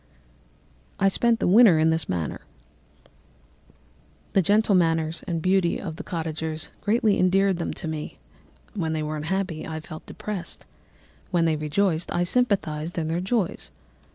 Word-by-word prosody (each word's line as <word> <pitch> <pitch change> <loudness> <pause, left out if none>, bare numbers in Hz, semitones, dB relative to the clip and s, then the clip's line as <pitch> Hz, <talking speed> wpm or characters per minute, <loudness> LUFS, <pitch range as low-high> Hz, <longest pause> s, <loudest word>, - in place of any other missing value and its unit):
_ - - -36 1.0
"I 195 - +4
spent 230 +4 +2
the - - +1
winter 200 -2 +7
in 160 +1 +3
this 160 -3 -1
manner. 85 -4 -3 1.9
The 195 - +4
gentle 205 +4 +3
manners 165 -2 +1
and 165 -3 -2
beauty 185 -2 +2
of 165 -5 -6
the 205 - -6
cottagers 160 -2 -4
greatly 215 -1 +2
endeared 190 +1 +3
them 170 - -3
to 170 - -6
me; 155 -1 -5 0.6
when 165 -7 -2
they 155 -1 -1
were 155 0 -3
unhappy, 165 +1 -2
I 160 -1 -4
felt 155 0 -10
depressed; 205 -5 -6 0.6
when 175 -2 +2
they 160 -1 +2
rejoiced, 160 +3 0
I 175 - +1
sympathised 175 -7 0
in 160 -1 -1
their 170 +2 -1
joys. 195 -1 -1
170 Hz, 155 wpm, -25 LUFS, 160-195 Hz, 1.9 s, winter